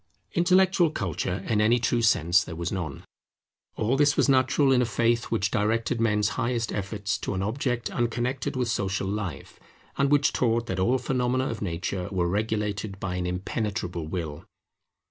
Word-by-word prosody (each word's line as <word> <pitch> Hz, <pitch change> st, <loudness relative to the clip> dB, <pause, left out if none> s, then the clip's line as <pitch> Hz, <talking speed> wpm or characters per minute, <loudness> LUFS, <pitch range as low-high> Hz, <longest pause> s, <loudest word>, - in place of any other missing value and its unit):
Intellectual 180 Hz, 0 st, +4 dB
culture 95 Hz, -, -3 dB
in 105 Hz, -2 st, +2 dB
any 115 Hz, +3 st, +4 dB
true 120 Hz, 0 st, +1 dB
sense 90 Hz, -5 st, +4 dB
there 85 Hz, -, -8 dB
was 85 Hz, +1 st, -3 dB
none. 85 Hz, -8 st, -4 dB, 0.7 s
All 115 Hz, +5 st, +1 dB
this 145 Hz, 0 st, +3 dB
was -, -, +4 dB
natural 135 Hz, +1 st, +3 dB
in 125 Hz, -1 st, +4 dB
a -, -, +2 dB
faith 115 Hz, +2 st, +1 dB
which 105 Hz, -2 st, -1 dB
directed 115 Hz, +2 st, 0 dB
men's 105 Hz, -2 st, +2 dB
highest 120 Hz, -2 st, -1 dB
efforts 100 Hz, 0 st, -2 dB
to -, -, -3 dB
an 95 Hz, -, -1 dB
object 125 Hz, +2 st, -2 dB
unconnected 120 Hz, +3 st, -1 dB
with 125 Hz, -2 st, 0 dB
social 95 Hz, -3 st, -1 dB
life, 95 Hz, -7 st, -5 dB, 0.4 s
and 140 Hz, 0 st, +3 dB
which 145 Hz, 0 st, +3 dB
taught 115 Hz, -1 st, +1 dB
that 95 Hz, -5 st, -3 dB
all 120 Hz, +8 st, +3 dB
the 125 Hz, -, -10 dB
phenomena 130 Hz, 0 st, 0 dB
of 115 Hz, -, -5 dB
nature 90 Hz, 0 st, -3 dB
were 90 Hz, -3 st, 0 dB
regulated 105 Hz, 0 st, -2 dB
by 95 Hz, -2 st, -3 dB
an 90 Hz, -1 st, -2 dB
impenetrable 90 Hz, -2 st, -3 dB
Will. 80 Hz, -4 st, -5 dB
110 Hz, 170 wpm, -26 LUFS, 95-125 Hz, 0.7 s, Intellectual